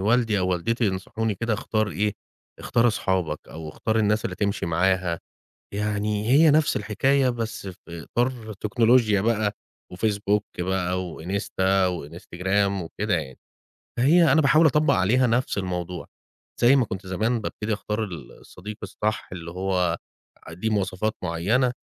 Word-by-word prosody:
والدي 110 Hz, +1 st, +2 dB
أو 95 Hz, -1 st, 0 dB
والدتي 115 Hz, +7 st, 0 dB
ينصحوني 100 Hz, +3 st, -2 dB
كده 115 Hz, +2 st, -1 dB
اختار 110 Hz, 0 st, -1 dB
إيه، 105 Hz, +5 st, 0 dB, 0.5 s
اختار 120 Hz, 0 st, +2 dB
أصحابك 95 Hz, -6 st, -1 dB
أو 80 Hz, 0 st, -8 dB
اختار 110 Hz, +8 st, -1 dB
الناس 110 Hz, +1 st, +2 dB
اللي 95 Hz, -6 st, -3 dB
تمشي 100 Hz, -3 st, -1 dB
معاها، 90 Hz, 0 st, +1 dB, 0.6 s
يعني 105 Hz, +1 st, -1 dB
هي 150 Hz, +5 st, +6 dB
نفس 150 Hz, +1 st, +3 dB
الحكاية 130 Hz, +6 st, +2 dB
بس 115 Hz, -4 st, -3 dB
في 85 Hz, -2 st, -9 dB
إطار 120 Hz, -3 st, -1 dB
تكنولوجيا 110 Hz, 0 st, +3 dB
بقى، 110 Hz, -1 st, +1 dB, 0.4 s
وFacebook 105 Hz, +1 st, +1 dB, 0.2 s
بقى، 90 Hz, 0 st, -1 dB, 0.2 s
وInsta 95 Hz, +1 st, 0 dB
وInstagram 90 Hz, +4 st, -2 dB
وكده 105 Hz, +5 st, -2 dB
يعني. 75 Hz, -6 st, -4 dB, 0.6 s
هي 165 Hz, +6 st, +5 dB
أنا 160 Hz, -, +5 dB
باحاول 155 Hz, +3 st, +5 dB
أطبّق 150 Hz, +1 st, +4 dB
عليها 115 Hz, +7 st, +3 dB
نفس 120 Hz, -1 st, 0 dB
الموضوع، 90 Hz, -2 st, -3 dB, 0.6 s
زي 120 Hz, +3 st, +6 dB
ما 130 Hz, -4 st, +3 dB
كنت 95 Hz, 0 st, -6 dB
زمان 110 Hz, +5 st, 0 dB
بابتدي 105 Hz, +1 st, -3 dB
أختار 105 Hz, +1 st, -2 dB
ال 85 Hz, -9 st, -7 dB
الصديق 105 Hz, +4 st, -10 dB
الصح 105 Hz, +2 st, -3 dB
اللي 85 Hz, -2 st, -7 dB
هو 90 Hz, -2 st, 0 dB, 0.5 s
ليه 90 Hz, +7 st, -3 dB
مواصفات 105 Hz, +1 st, -1 dB
معينة، 105 Hz, +10 st, +1 dB
105 Hz, 140 wpm, -24 LUFS, 95-115 Hz, 0.6 s, هي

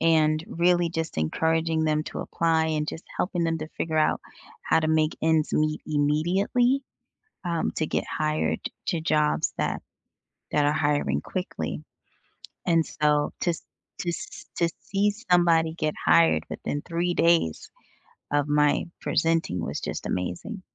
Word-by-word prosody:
and 155 Hz, -1 st, +3 dB
really 175 Hz, 0 st, +2 dB
just 160 Hz, -, -3 dB
encouraging 160 Hz, -, +1 dB
them 155 Hz, 0 st, +1 dB
to -, -, -5 dB
apply, 165 Hz, -1 st, +1 dB
and 155 Hz, -1 st, -1 dB
just 160 Hz, -, -6 dB
helping 180 Hz, -2 st, 0 dB
them 165 Hz, 0 st, 0 dB
to 155 Hz, -, -6 dB
figure 160 Hz, -1 st, 0 dB
out 155 Hz, -, +2 dB, 0.4 s
how -, -, +3 dB
to 155 Hz, -, 0 dB
make 155 Hz, 0 st, +2 dB
ends 160 Hz, -1 st, +2 dB
meet 155 Hz, 0 st, +1 dB
immediately, 180 Hz, -, +2 dB, 0.6 s
um, 170 Hz, -2 st, 0 dB
to 155 Hz, -, +1 dB
get -, -, -1 dB
hired 155 Hz, 0 st, 0 dB, 0.3 s
to 170 Hz, -, 0 dB
jobs 150 Hz, -1 st, +1 dB
that -, -, -1 dB, 0.7 s
that 150 Hz, -, +3 dB
are 145 Hz, -, +3 dB
hiring 145 Hz, -, +1 dB
quickly. 185 Hz, -, -4 dB, 0.8 s
And 165 Hz, -2 st, +4 dB
so 150 Hz, -1 st, +1 dB
to 175 Hz, -, +2 dB, 0.5 s
to 175 Hz, -, -1 dB
se -, -, -7 dB
to 170 Hz, -, +3 dB
see 200 Hz, +1 st, +1 dB, 0.2 s
somebody 165 Hz, -2 st, +4 dB
get 155 Hz, -2 st, -1 dB
hired 165 Hz, -1 st, +5 dB
within 145 Hz, -, -3 dB
3 175 Hz, +1 st, -1 dB
days 165 Hz, -, +2 dB, 0.6 s
of 145 Hz, 0 st, +2 dB
my 150 Hz, 0 st, +3 dB, 0.2 s
presenting 165 Hz, -, +1 dB
was -, -, -3 dB
just -, -, -4 dB
amazing. 185 Hz, -, -3 dB
160 Hz, 145 wpm, -26 LUFS, 150-170 Hz, 0.8 s, hired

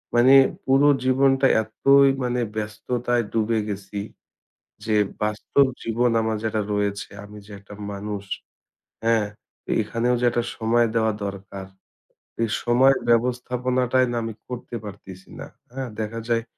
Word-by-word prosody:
মানে 130 Hz, +3 st, +6 dB, 0.3 s
পুরো 135 Hz, +2 st, +4 dB, 0.2 s
জীবনটা 135 Hz, +1 st, +4 dB, 0.2 s
এতই 135 Hz, +5 st, +4 dB
মানে 125 Hz, 0 st, -1 dB, 0.2 s
ব্যস্ততায় 120 Hz, +3 st, -2 dB
ডুবে 110 Hz, 0 st, +1 dB
গেছি 100 Hz, 0 st, -5 dB, 0.9 s
যে 110 Hz, -, 0 dB, 0.3 s
বাস্তব 105 Hz, +6 st, +2 dB, 0.2 s
জীবন 120 Hz, +2 st, +1 dB
আমার 110 Hz, 0 st, -1 dB
যেটা 110 Hz, -1 st, 0 dB
রয়েছে, 100 Hz, -1 st, -2 dB
আমি 105 Hz, 0 st, -11 dB
যে -, -, -17 dB
একটা 100 Hz, +1 st, -13 dB, 0.2 s
মানুষ, 100 Hz, 0 st, -5 dB, 0.8 s
হ্যাঁ? 115 Hz, -2 st, +2 dB, 0.6 s
এখানেও 115 Hz, +3 st, 0 dB
যেটা 120 Hz, 0 st, +2 dB, 0.2 s
সময় 115 Hz, +1 st, +2 dB
দেওয়া 110 Hz, -1 st, +2 dB
দরকার, 100 Hz, -1 st, -7 dB, 0.8 s
এই 115 Hz, -, 0 dB
সময় 130 Hz, +3 st, +4 dB
ব্যবস্থাপনাটাই 125 Hz, +1 st, +1 dB
না 120 Hz, -, -2 dB
আমি 115 Hz, -, -4 dB
করতে 125 Hz, -1 st, -7 dB
পারতেছি 95 Hz, -2 st, -11 dB
না। -, -, -7 dB, 0.2 s
হ্যাঁ? 130 Hz, -1 st, -5 dB
দেখা 110 Hz, +2 st, -4 dB
যায় 115 Hz, -1 st, +1 dB
115 Hz, 125 wpm, -23 LUFS, 105-125 Hz, 0.9 s, মানে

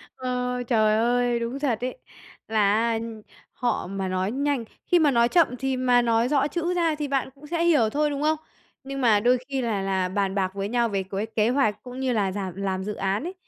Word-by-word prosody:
Ờ, 250 Hz, -1 st, -2 dB
trời 215 Hz, -3 st, +3 dB
ơi, 240 Hz, +1 st, +2 dB
đúng 235 Hz, +4 st, -3 dB
thật 245 Hz, -5 st, -1 dB
ấy 255 Hz, -, -3 dB, 0.5 s
là 210 Hz, -2 st, +3 dB
á 225 Hz, +1 st, +1 dB, 0.5 s
họ 245 Hz, -6 st, -1 dB
mà 195 Hz, 0 st, -3 dB
nói 185 Hz, +2 st, -1 dB
nhanh 280 Hz, -1 st, 0 dB, 0.2 s
khi 350 Hz, -, +4 dB
mà 295 Hz, -3 st, +4 dB
nói 235 Hz, -1 st, +3 dB
chậm 340 Hz, +1 st, +5 dB
thì 265 Hz, -1 st, -1 dB
mà 250 Hz, -1 st, +4 dB
nói 230 Hz, 0 st, +2 dB
rõ 285 Hz, 0 st, +2 dB
chữ 340 Hz, +4 st, -2 dB
ra 335 Hz, -3 st, +1 dB
thì 300 Hz, -1 st, -3 dB
bạn 270 Hz, -2 st, -1 dB
cũng 290 Hz, +2 st, -14 dB
sẽ 335 Hz, +2 st, -1 dB
hiểu 295 Hz, -11 st, +4 dB
thôi, 300 Hz, +4 st, +1 dB
đúng 285 Hz, 0 st, -3 dB
không? 310 Hz, +1 st, +2 dB, 0.5 s
Nhưng 275 Hz, 0 st, -5 dB
mà 225 Hz, -4 st, +4 dB
đôi 245 Hz, +4 st, +3 dB
khi 270 Hz, -2 st, -2 dB
là 215 Hz, -5 st, -1 dB
là 190 Hz, -1 st, 0 dB
bàn 195 Hz, 0 st, -1 dB
bạc 190 Hz, -2 st, 0 dB
với 200 Hz, 0 st, -3 dB
nhau 235 Hz, 0 st, +1 dB
về 195 Hz, -1 st, -1 dB
cuối 195 Hz, +2 st, -3 dB
kế 220 Hz, +1 st, +3 dB
hoạch 250 Hz, -5 st, +1 dB
cũng 250 Hz, +1 st, -8 dB
như 260 Hz, -1 st, 0 dB
là 200 Hz, -4 st, +1 dB
làm 190 Hz, -3 st, -4 dB
làm 190 Hz, -1 st, -2 dB
dự 210 Hz, +1 st, -3 dB
án 195 Hz, +4 st, -1 dB
ấy, 360 Hz, +3 st, -5 dB
240 Hz, 230 wpm, -25 LUFS, 205-275 Hz, 0.5 s, chậm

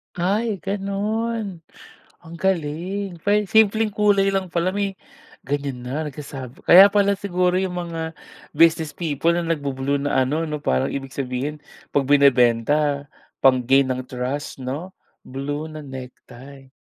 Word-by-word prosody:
Ay, 200 Hz, +3 st, -1 dB
gano'n. 205 Hz, +1 st, -2 dB, 0.6 s
Ang 170 Hz, 0 st, -10 dB
galing. 180 Hz, +2 st, -2 dB
Pwe 210 Hz, 0 st, +2 dB
simpleng 220 Hz, 0 st, +4 dB
kulay 200 Hz, -2 st, +3 dB
lang 190 Hz, -1 st, 0 dB
pala, 175 Hz, +1 st, +1 dB
may 200 Hz, -1 st, -1 dB, 0.5 s
ganyan 140 Hz, -3 st, -3 dB
na 150 Hz, +5 st, -3 dB
nagsasabi. 135 Hz, -3 st, -9 dB
Kaya 190 Hz, +3 st, +10 dB
pala 200 Hz, -1 st, +2 dB
siguro 180 Hz, -2 st, +1 dB
yung 185 Hz, -1 st, -2 dB, 0.2 s
mga 165 Hz, -1 st, -4 dB, 0.4 s
business 160 Hz, 0 st, +3 dB
people 165 Hz, 0 st, 0 dB
na 175 Hz, -, 0 dB
nagbu-blue 140 Hz, -3 st, -1 dB
na 130 Hz, -2 st, +2 dB
ano 150 Hz, +5 st, -1 dB
'no, 150 Hz, -1 st, -5 dB
parang 65 Hz, 0 st, +1 dB
ibig 135 Hz, -1 st, -5 dB
sabihin 135 Hz, +3 st, -3 dB, 0.4 s
'pag 140 Hz, -2 st, +2 dB
binebenta 140 Hz, +1 st, +3 dB, 0.4 s
pang-gain 130 Hz, +1 st, +4 dB
ng 130 Hz, 0 st, -3 dB
trust 130 Hz, +2 st, -4 dB
'no, 155 Hz, +9 st, -5 dB, 0.3 s
blue 145 Hz, +3 st, -4 dB
na 155 Hz, 0 st, -8 dB
necktie. 130 Hz, 0 st, -11 dB
155 Hz, 130 wpm, -22 LUFS, 135-190 Hz, 0.6 s, Kaya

